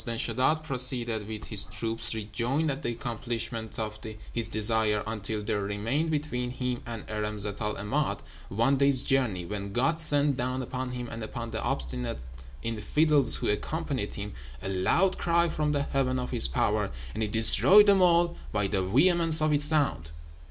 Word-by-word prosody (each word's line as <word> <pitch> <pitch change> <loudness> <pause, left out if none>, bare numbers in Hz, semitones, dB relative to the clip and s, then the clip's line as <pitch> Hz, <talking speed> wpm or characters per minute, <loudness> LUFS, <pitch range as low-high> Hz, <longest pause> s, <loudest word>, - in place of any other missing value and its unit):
Then 115 -2 -3
Sheddád 150 +7 0
proceeded 125 -6 0
with 110 -1 -7
his 105 -2 +2
troops, 115 0 -2
rejoiced 120 +8 -2
at 135 - -5
the - - -3
accomplishment 115 -1 -3
of 110 -1 -5 0.3
his 115 -2 +1
desire, 110 -1 +1
until 110 -1 -4
there 105 -1 -2
remained 110 +11 -2
between 145 -5 -3
him 125 -1 -4
and 115 -2 -7
Irem 105 0 -4
Zat 100 0 -2
el 105 0 -2
'Emád 135 +9 -2 0.3
one 115 +7 +1
day's 140 -1 +4
journey, 120 -10 0
when 100 +1 -6
God 145 +8 0
sent 145 -3 +4
down 130 +1 -3
upon 130 +1 -5
him 125 -1 -5
and 115 0 -8
upon 115 +2 -6
the 110 - -3
obstinate 60 -1 -3 0.4
infidels 135 +4 +2
who - - -3
accompanied 135 0 -3
him 105 0 -6 0.3
a 95 - -4
loud 95 - +1
cry 170 0 +2
from 150 -1 -1
the 145 -1 0
heaven 130 -2 -1
of 125 - -4
His 65 - +2
power, 60 - -1 0.2
and 110 - -5
it 105 -1 -2
destroyed 185 - +6
them 200 -2 +4
all 170 -1 +3 0.2
by 105 -2 0
the 95 -1 -1
vehemence 160 - +6
of 155 -1 +2
its 145 0 +5
sound. 145 - +1
120 Hz, 175 wpm, -27 LUFS, 105-145 Hz, 0.4 s, destroyed